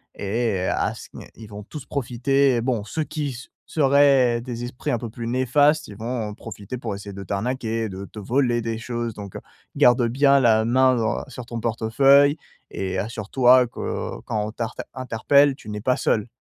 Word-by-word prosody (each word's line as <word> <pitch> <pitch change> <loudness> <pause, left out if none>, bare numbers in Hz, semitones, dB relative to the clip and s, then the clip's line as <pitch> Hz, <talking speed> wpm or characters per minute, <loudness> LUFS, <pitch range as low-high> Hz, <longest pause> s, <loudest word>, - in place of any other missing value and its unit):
Et 105 0 -1
à 95 - 0
ce - - -11
n - - -10
ils 110 - -11
vont 105 0 -9
tous 145 +5 -9
profiter, 135 0 +1
bon, 120 -3 -1
ceux 155 +8 -3
qui 150 -2 -4
s 130 0 -9 0.2
seraient 135 -5 +3
des 120 -1 -5
esprits 125 +1 -4
un 120 - +1
peu 115 0 -6
plus 115 +1 -7
néfastes, 145 +5 +2
ils 105 - -10
vont 115 0 -4
profiter 105 +2 -8
pour 115 -4 -4
essayer 100 0 -8
de 100 0 -7
t'arnaquer, 115 +3 -2
de 95 0 -7
te 105 - -10
voler 120 +2 +1
des 115 0 -3
choses, 120 0 -4
donc 100 -2 -8
heu, - - -6 0.4
garde 120 0 +5
bien 140 +2 +4
la 110 -3 +4
main 130 +2 +4
dans 110 -2 -1
sur 125 -1 -8
ton 115 -1 -6
portefeuille 135 +6 +4 0.3
et 95 -1 -4
assure-toi 120 +5 +3
que, - - -13
heu, - - -4
quand 105 -1 -2
on 105 - -5
t'arte 115 0 -5
interpelle, 135 +3 +2
tu 110 -6 -12
n'es 105 - -4
pas 125 +4 +1
seul. 110 +1 0
120 Hz, 195 wpm, -23 LUFS, 110-130 Hz, 0.4 s, garde